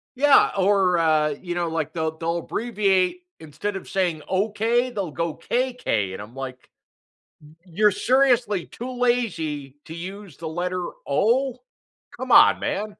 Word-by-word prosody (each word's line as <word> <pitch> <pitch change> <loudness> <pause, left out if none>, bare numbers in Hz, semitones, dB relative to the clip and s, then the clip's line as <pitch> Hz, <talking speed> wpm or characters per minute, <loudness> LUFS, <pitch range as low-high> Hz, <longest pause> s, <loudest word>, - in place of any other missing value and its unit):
Yeah, 285 +2 +5
or, 190 -2 +3
uh, 155 -2 +3
you 175 -2 -5
know, 175 -1 -1
like, 160 -2 -3
the 160 -1 -1
they'll 165 +1 -2
abbreviate 205 - 0 0.2
instead 160 +7 -5
of 190 - -8
saying 175 -5 -1
"Okay", 225 +5 +1
they'll 200 -7 -4
go 165 +1 -3
"K-K", 240 - -1
and 95 - -7
I'm 110 +4 -12
like, 130 -1 -8 0.7
"Y 150 +1 -16
you're 205 +5 +2
seriously 240 -2 +2
too 250 +1 -8
lazy 165 - -1
to 160 - -9
use 185 -1 -8
the 165 - -6
letter 180 +2 -3 0.2
O? 245 - +1 0.6
Come - - -5
on, - - +7
man." 210 +1 -3
185 Hz, 150 wpm, -23 LUFS, 160-225 Hz, 0.7 s, on